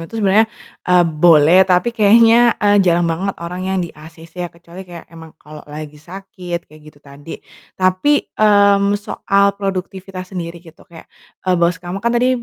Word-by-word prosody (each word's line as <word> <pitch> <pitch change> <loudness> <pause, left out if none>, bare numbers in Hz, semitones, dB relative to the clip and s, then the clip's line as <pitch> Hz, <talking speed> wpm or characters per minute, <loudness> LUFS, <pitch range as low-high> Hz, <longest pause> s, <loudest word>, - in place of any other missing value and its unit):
itu 225 - -9
sebenarnya, 215 +1 +2 0.4
eee, 180 -1 +4
boleh, 165 +1 +4
tapi 180 +6 +1
kayaknya, 230 +2 +4
eee, 205 -1 +2
jarang 175 -2 +2
banget 170 +4 -3
orang 175 +2 -7
yang 190 0 -1
di 170 - -10
ACC 165 +3 -13
ya, 175 - -4
kecuali 170 +2 -14
kayak 170 -2 -11
emang 160 -1 -14
kalau 150 -1 -13
lagi 150 0 -10
sakit 180 0 -8
kayak 155 +1 -19
gitu 150 - -19
tadi. 145 +3 -11 0.4
Tapi, 185 +11 0
mmm, 200 -1 +3
soal 200 -1 0
produktivitas 190 -1 -6
sendiri 170 -2 -6
gitu, 165 -1 -17
kayak, 165 -2 -14 0.4
eee, 185 - +2
bos 170 0 +1
kamu 175 +3 -7
kan 235 +3 -1
tadi 250 +2 +2
180 Hz, 170 wpm, -17 LUFS, 165-200 Hz, 0.4 s, eee